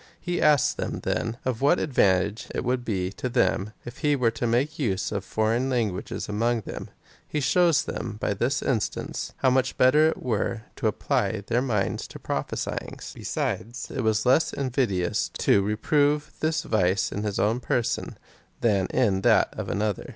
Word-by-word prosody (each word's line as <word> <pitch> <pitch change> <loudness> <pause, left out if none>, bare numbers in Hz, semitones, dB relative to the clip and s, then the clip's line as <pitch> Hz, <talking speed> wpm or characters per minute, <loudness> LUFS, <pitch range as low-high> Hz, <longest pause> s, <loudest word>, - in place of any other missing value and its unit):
He 175 0 -2
asks 150 -3 +4
them, - - -4
then, 115 +1 -1
of 130 -2 -1
what 145 +6 +4
advantage 105 -5 +1
it - - -1
would 125 0 0
be 95 -5 -2
to 125 +6 -4
them, 110 -4 +1
if 120 - -9
he 150 -2 +2
were 125 -4 +2
to 115 +1 -2
make 135 +7 0
use 95 -8 -1
of 100 -2 -2
foreign 110 +6 0
languages 110 -8 -2
among 115 +3 0
them. - - -7 0.4
He 150 - -2
shows 170 +2 +3
them 110 -3 -5
by - - 0
this 120 +7 0
instance, 115 -6 -2
how 130 - +3
much 130 0 +1
better 150 +5 +5
it 160 - 0
were 115 -1 -1
to - - 0
apply 100 - 0
their 120 +3 +1
minds 105 -7 -1
to - - -10
prophesyings. - - -4
Besides, 120 +4 -3
it 135 - -2
was 110 -1 +1
less 130 +6 +3
invidious 120 -10 0
to 100 - +4
reprove 145 +8 +1
this 160 +1 0
vice 95 - +1
in 100 - -3
his 105 -2 -2
own 110 +4 +2
person, 120 -2 -1 0.4
than 100 -5 +2
in 100 -6 +1
that - - +4
of - - -5
an 105 - -1
other. 105 -3 -2
120 Hz, 175 wpm, -26 LUFS, 105-130 Hz, 0.4 s, better